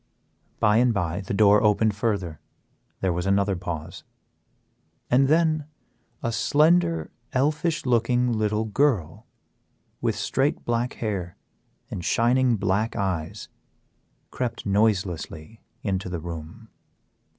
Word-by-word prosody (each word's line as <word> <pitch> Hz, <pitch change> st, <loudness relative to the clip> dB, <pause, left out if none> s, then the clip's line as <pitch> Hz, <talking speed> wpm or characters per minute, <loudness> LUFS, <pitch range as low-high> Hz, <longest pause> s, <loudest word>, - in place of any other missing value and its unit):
By 105 Hz, 0 st, +4 dB
and 120 Hz, -1 st, +3 dB
by 90 Hz, -1 st, -1 dB
the 95 Hz, -, -5 dB
door 105 Hz, 0 st, +5 dB
opened 105 Hz, 0 st, +3 dB
further, 100 Hz, -7 st, -2 dB, 0.6 s
there 95 Hz, -2 st, +1 dB
was 90 Hz, +2 st, -2 dB
another 100 Hz, 0 st, +2 dB
pause, 85 Hz, -4 st, -6 dB, 1.1 s
and 135 Hz, +2 st, +5 dB
then 155 Hz, -1 st, +2 dB, 0.6 s
a 115 Hz, -, 0 dB
slender, 165 Hz, +7 st, +2 dB, 0.2 s
elfish 150 Hz, +4 st, 0 dB
looking 125 Hz, 0 st, +2 dB
little 110 Hz, 0 st, 0 dB
girl, 105 Hz, -, 0 dB, 0.7 s
with -, -, 0 dB
straight 135 Hz, +3 st, -1 dB
black 120 Hz, +1 st, 0 dB
hair 95 Hz, -6 st, -4 dB, 0.5 s
and 90 Hz, -, -5 dB
shining 120 Hz, +5 st, +3 dB
black 105 Hz, +2 st, 0 dB
eyes, 95 Hz, -1 st, -3 dB, 0.8 s
crept 125 Hz, -2 st, -4 dB
noiselessly 100 Hz, -3 st, -1 dB, 0.2 s
into 95 Hz, -2 st, -2 dB
the 90 Hz, -2 st, -3 dB
room. 85 Hz, +7 st, -8 dB
105 Hz, 110 wpm, -25 LUFS, 95-125 Hz, 1.1 s, door